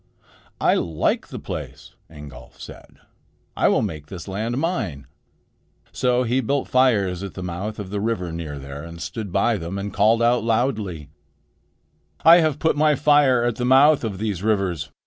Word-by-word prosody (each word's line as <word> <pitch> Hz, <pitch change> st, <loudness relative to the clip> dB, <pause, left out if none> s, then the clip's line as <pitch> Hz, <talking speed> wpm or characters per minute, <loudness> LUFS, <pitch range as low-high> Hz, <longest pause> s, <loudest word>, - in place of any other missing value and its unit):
"I -, -, +3 dB
like 80 Hz, -2 st, -1 dB
the -, -, -8 dB
place," -, -, -8 dB, 0.2 s
Ingolf 75 Hz, -4 st, -13 dB
said. -, -, -12 dB, 0.6 s
"I -, -, +2 dB
will -, -, +2 dB
make 75 Hz, -2 st, -5 dB
this 90 Hz, 0 st, -9 dB
land 110 Hz, +5 st, -3 dB
mine." 115 Hz, -, -2 dB, 0.9 s
So 125 Hz, 0 st, +1 dB
he 125 Hz, +2 st, 0 dB
built 140 Hz, +3 st, -1 dB
fires 105 Hz, -9 st, +2 dB
at 100 Hz, -1 st, -7 dB
the 95 Hz, -, -6 dB
mouth 90 Hz, +5 st, -5 dB
of 95 Hz, -2 st, -7 dB
the 100 Hz, -1 st, -2 dB
river 100 Hz, -6 st, -2 dB
near 80 Hz, -3 st, -6 dB
there, 70 Hz, +1 st, -8 dB
and 85 Hz, 0 st, -10 dB
stood 105 Hz, +1 st, -6 dB
by 105 Hz, +4 st, +1 dB
them 85 Hz, +2 st, -5 dB
and 100 Hz, +1 st, -5 dB
called 110 Hz, +3 st, +3 dB
out 120 Hz, -1 st, +2 dB
loudly: 110 Hz, -, -1 dB, 1.2 s
"I 165 Hz, +1 st, +9 dB
have 155 Hz, -4 st, +1 dB
put 160 Hz, +1 st, +1 dB
my 150 Hz, 0 st, +3 dB
fire 145 Hz, -4 st, +4 dB
at 120 Hz, -1 st, -1 dB
the 125 Hz, -, -3 dB
mouth 135 Hz, +3 st, +5 dB
of 105 Hz, -4 st, -3 dB
these 100 Hz, -3 st, -3 dB
rivers. 95 Hz, -8 st, -1 dB
105 Hz, 170 wpm, -22 LUFS, 85-125 Hz, 1.2 s, I